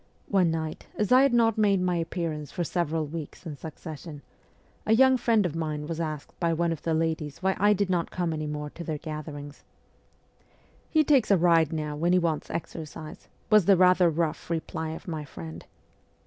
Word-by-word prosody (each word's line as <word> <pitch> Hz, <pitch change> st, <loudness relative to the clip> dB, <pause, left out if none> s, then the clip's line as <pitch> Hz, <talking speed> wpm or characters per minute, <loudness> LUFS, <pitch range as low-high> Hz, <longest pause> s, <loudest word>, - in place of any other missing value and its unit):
One 190 Hz, -4 st, +3 dB
night, 160 Hz, -1 st, -4 dB
as 210 Hz, +1 st, -1 dB
I 255 Hz, +1 st, +8 dB
had 275 Hz, -1 st, +4 dB
not 225 Hz, -2 st, +3 dB
made 200 Hz, -2 st, +4 dB
my 180 Hz, -1 st, +1 dB
appearance 165 Hz, -4 st, -3 dB
for 175 Hz, -, -2 dB
several 165 Hz, -2 st, -1 dB
weeks 155 Hz, +3 st, -8 dB
in 155 Hz, -3 st, -5 dB
succession, 155 Hz, 0 st, -9 dB, 0.6 s
a 220 Hz, -, +2 dB
young 260 Hz, +2 st, +6 dB
friend 230 Hz, -4 st, +2 dB
of 165 Hz, -3 st, -2 dB
mine 155 Hz, -2 st, -3 dB
was 165 Hz, +1 st, -4 dB
asked 155 Hz, -3 st, -4 dB
by 170 Hz, -2 st, +1 dB
one 170 Hz, +1 st, +1 dB
of 165 Hz, -, -4 dB
the 165 Hz, -1 st, 0 dB
ladies 160 Hz, -1 st, -2 dB
why 190 Hz, 0 st, +2 dB
I 205 Hz, +2 st, +5 dB
did 200 Hz, 0 st, 0 dB
not 175 Hz, -3 st, 0 dB
come 175 Hz, -3 st, -2 dB
any 155 Hz, -1 st, -3 dB
more 150 Hz, 0 st, -4 dB
to 170 Hz, -, -8 dB
their 155 Hz, -2 st, -3 dB
gatherings. 150 Hz, -2 st, -7 dB, 0.6 s
' -, -, -36 dB, 0.3 s
He 310 Hz, -1 st, +4 dB
takes 270 Hz, -6 st, +3 dB
a 200 Hz, -, +5 dB
ride 165 Hz, -3 st, +4 dB
now 150 Hz, -2 st, -3 dB
when 170 Hz, +4 st, +1 dB
he -, -, +5 dB
wants 165 Hz, -4 st, -1 dB
exercise,' 155 Hz, -2 st, -7 dB, 0.2 s
was 210 Hz, -4 st, +6 dB
the 195 Hz, 0 st, +6 dB
rather 180 Hz, -1 st, +5 dB
rough 165 Hz, 0 st, -2 dB
reply 160 Hz, -1 st, -3 dB
of 160 Hz, -, -8 dB
my 160 Hz, -3 st, -4 dB
friend. 80 Hz, -, -9 dB
165 Hz, 200 wpm, -27 LUFS, 155-185 Hz, 0.6 s, I